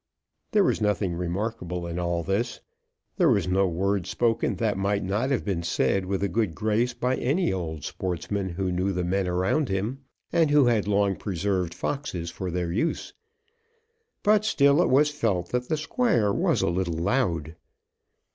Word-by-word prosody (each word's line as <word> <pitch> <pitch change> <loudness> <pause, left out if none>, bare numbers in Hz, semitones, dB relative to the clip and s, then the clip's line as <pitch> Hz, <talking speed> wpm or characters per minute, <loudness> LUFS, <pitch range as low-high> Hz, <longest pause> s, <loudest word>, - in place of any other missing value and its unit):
There 210 -2 +4
was - - +1
nothing 105 -3 +1
remarkable 90 0 -3
in 85 +1 -4
all 85 -1 -1
this. 100 +7 -1 0.6
There 175 -5 +4
was 100 -8 +2
no 95 +1 +2
word 95 +2 -1
spoken 115 -2 0
that 110 -3 0
might 100 +1 0
not 105 +8 -1
have 135 -4 0
been 95 -5 -1
said 90 +3 0
with 100 0 -1
a - - +2
good 105 -5 -1
grace 110 +3 0
by 125 +2 0
any 150 - +1
old 80 -5 -4
sportsman, 95 +2 -3
who 90 +1 -2
knew 90 +2 0
the 90 0 -1
men 95 +2 0
around 95 - +1
him, 105 +8 -2 0.3
and 165 -3 +4
who 145 -2 +5
had 115 -4 +2
long 100 -1 +2
preserved 95 -2 -2
foxes 95 - -3
for 90 +2 -5
their 90 -1 -2
use; 115 - -2 1.1
but 210 0 +4
still 140 -7 +4
it - - +2
was 145 +3 +4
felt 105 -12 -1
that 125 0 -2
the 155 - +1
Squire 150 - +1
was - - +1
a - - +1
little 85 -1 -1
loud. 85 - 0
100 Hz, 175 wpm, -26 LUFS, 90-120 Hz, 1.1 s, who